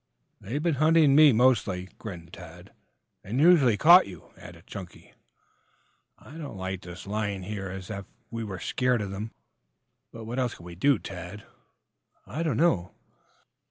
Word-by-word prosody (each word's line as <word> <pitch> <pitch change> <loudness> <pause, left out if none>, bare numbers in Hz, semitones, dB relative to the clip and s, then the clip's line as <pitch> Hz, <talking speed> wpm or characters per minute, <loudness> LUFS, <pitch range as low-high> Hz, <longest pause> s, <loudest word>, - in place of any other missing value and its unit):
"They've 140 +9 -4
been 170 -2 +2
hunting 155 -2 +5
me 150 -1 +8
mostly," 110 -7 +2
grinned 85 -6 -9
Tad. 90 +1 -12 0.5
"And 115 +7 -3
usually 145 -9 +5
caught 170 - +7
you," 90 -5 -12
added - - -13
Chunky. 90 -3 -10 1.0
"I 155 +5 -13
don't 145 -10 -7
like 95 0 -4
this 85 +1 -10
lying 100 -1 -3
here 100 0 -5
as 95 +1 -7
if 100 -2 -6 0.2
we 115 -1 -4
were 100 -4 -6
scared 125 +2 0
of 100 - -6
them." 105 +3 -5 0.8
"But, 115 - -9
what 120 +4 -4
else 125 -3 -1
can 85 - -14
we 90 - -9
do, 135 +9 +3
Tad?" 95 +2 -9 0.8
"I 155 - -5
don't 155 -8 0
know." 105 - +1
105 Hz, 160 wpm, -27 LUFS, 95-135 Hz, 1.0 s, me